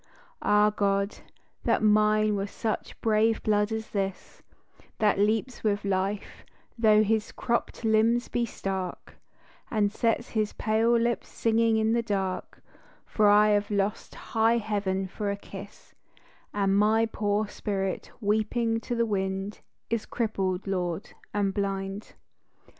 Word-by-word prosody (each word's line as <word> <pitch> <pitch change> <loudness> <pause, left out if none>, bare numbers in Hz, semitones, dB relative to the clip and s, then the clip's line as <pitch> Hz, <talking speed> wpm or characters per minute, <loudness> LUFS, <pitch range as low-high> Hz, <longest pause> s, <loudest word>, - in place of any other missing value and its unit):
Ah 210 0 +4
God, 200 -1 0 0.5
that - - +2
mine 215 0 +4
were 200 0 -2
such 220 +1 -4
brave 220 0 +2
blood 210 0 +2
as 220 0 -4
this, 195 -2 -4 0.6
That 210 -3 +2
leaps 220 +4 0
with 205 -1 0
life 195 +1 -2 0.3
though 215 -2 +5
his 215 0 0
cropped 235 0 -2
limbs 225 +2 +3
be 240 - -1
stark, 190 -5 -5 0.5
And 210 -2 +1
sets 230 +1 0
his 215 -2 -1
pale 225 +2 +2
lips 235 0 -1
singing 225 0 +2
in 220 +1 +2
the 235 - +2
dark, 195 -4 -3 0.4
For 210 -1 +3
I 210 +1 +6
have 205 0 +2
lost 200 0 -2
high 225 +1 +1
heaven 200 -3 -1
for 205 +2 -4
a 200 - -2
kiss, 200 0 -11 0.6
And 195 -1 +1
my 215 +2 +4
poor 210 -1 -1
spirit 195 -2 -3
weeping 225 +2 +1
to 240 - -4
the 235 0 +2
wind 195 -1 -2 0.3
Is 230 -2 -1
crippled, 195 -5 -1
Lord, 180 -2 -3 0.2
and 200 -2 0
blind. 195 0 -3
210 Hz, 135 wpm, -27 LUFS, 200-220 Hz, 0.6 s, I